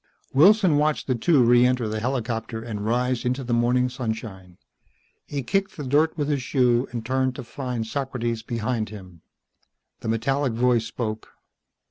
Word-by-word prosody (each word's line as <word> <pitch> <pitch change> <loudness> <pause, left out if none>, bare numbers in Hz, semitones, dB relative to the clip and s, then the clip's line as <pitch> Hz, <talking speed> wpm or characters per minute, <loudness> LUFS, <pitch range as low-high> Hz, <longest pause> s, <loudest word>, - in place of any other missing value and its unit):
Wilson 185 +2 +5
watched 150 +1 +1
the 130 - +1
two 130 +3 +3
re 120 +1 +5
enter 125 -2 +2
the 110 0 -2
helicopter 115 -2 -3
and 110 -3 -5
rise 125 +2 0
into 125 +2 -1
the 120 -1 -2
morning 125 +2 +2
sunshine. 110 -7 -6 0.7
He 140 -2 -4
kicked 195 +10 -1
the 150 - -5
dirt 150 +5 +2
with 145 -2 -1
his 145 -3 0
shoe 125 -1 +2
and 120 -2 -6
turned 130 0 0
to 130 - -6
find 125 -2 -4
Socrates 120 -2 -3
behind 115 0 -2
him. 95 -5 -12 0.8
The - - -7
metallic 135 +3 0
voice 120 -1 +2
spoke. 110 -1 -5
125 Hz, 160 wpm, -24 LUFS, 115-135 Hz, 0.8 s, Wilson